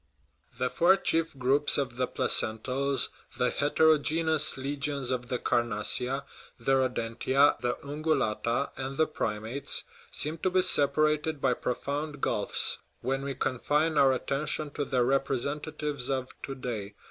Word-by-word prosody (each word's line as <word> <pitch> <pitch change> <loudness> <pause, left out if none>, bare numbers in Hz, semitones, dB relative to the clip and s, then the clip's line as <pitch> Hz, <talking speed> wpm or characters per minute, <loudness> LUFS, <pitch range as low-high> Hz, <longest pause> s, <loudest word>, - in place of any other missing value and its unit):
The 125 - -1
four 180 +3 +5
chief 165 -5 0
groups 135 +3 +3
of 130 -4 -2
the 125 0 0
placentals, 130 +5 +1 0.3
the - - +1
heterogeneous 155 +1 +3
legions 140 -1 -2
of 125 -1 -2
the 125 - -1
carnassia, 120 +4 +1 0.3
the 120 +3 -1
rodentia, 130 +2 +2
the 120 0 0
ungulata, 140 -4 -1
and 135 +1 -4
the 160 - +4
primates, 115 -1 -2 0.3
seem 155 +2 -2
to 185 - +1
be 185 0 +3
separated 150 0 +2
by 135 -2 +2
profound 145 +5 -3
gulfs, - - +1 0.2
when 135 +2 -1
we 140 -1 -4
confine 150 +6 0
our 135 -2 +5
attention 140 +3 -1
to 145 0 -3
their 130 -3 +1
representatives 140 +1 -2
of 130 -1 -1
to 135 - -5
day. 110 -6 -5
140 Hz, 135 wpm, -28 LUFS, 125-150 Hz, 0.3 s, four